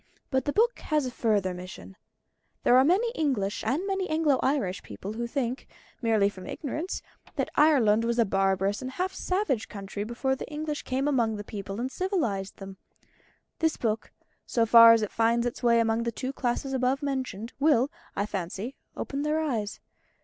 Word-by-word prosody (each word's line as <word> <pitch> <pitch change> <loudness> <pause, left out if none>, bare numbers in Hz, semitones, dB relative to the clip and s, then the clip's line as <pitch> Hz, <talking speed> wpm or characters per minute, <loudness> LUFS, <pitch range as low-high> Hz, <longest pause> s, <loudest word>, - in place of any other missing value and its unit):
But 265 -2 +1
the 290 - +1
book 465 +8 +2
has 305 -3 0
a 255 - -3
further 205 -6 +1
mission. 180 +1 -9 0.7
There 245 - +5
are 260 - +7
many 390 - +3
English 260 - -1
and 275 - 0
many 385 -1 -1
Anglo 310 -4 +2
Irish 210 -10 0
people 150 - -7
who 235 +2 -3
think, 250 0 -3 0.3
merely 220 -4 +3
from 185 -2 -7
ignorance, 315 +5 -4 0.3
that - - -1
Ireland 245 -8 +4
was 235 0 0
a 235 - +4
barbarous 195 +1 +1
and 260 - -4
half 365 +8 -2
savage 365 - -1
country 200 0 -5
before 245 +4 -1
the 265 - -7
English 300 0 -3
came 265 +2 -1
among 235 -6 +2
the 205 - -5
people 200 0 -6
and 255 +2 -2
civilised 255 - -2
them. 195 -1 -9 0.8
This 320 -1 +1
book, 220 -2 -2 0.4
so 230 -2 +2
far 230 0 +9
as 225 -1 +2
it 210 - -3
finds 230 +1 +2
its 240 - -3
way 235 -1 +4
among 225 0 +2
the 235 0 -1
two 260 +4 -4
classes 265 +1 -2
above 260 +2 +1
mentioned, 255 -5 -3
will, 285 -3 +3 0.2
I 200 - 0
fancy, 200 +5 -4 0.2
open 280 0 -3
their 300 +1 +1
eyes. 230 -10 -2
240 Hz, 180 wpm, -27 LUFS, 210-285 Hz, 0.8 s, far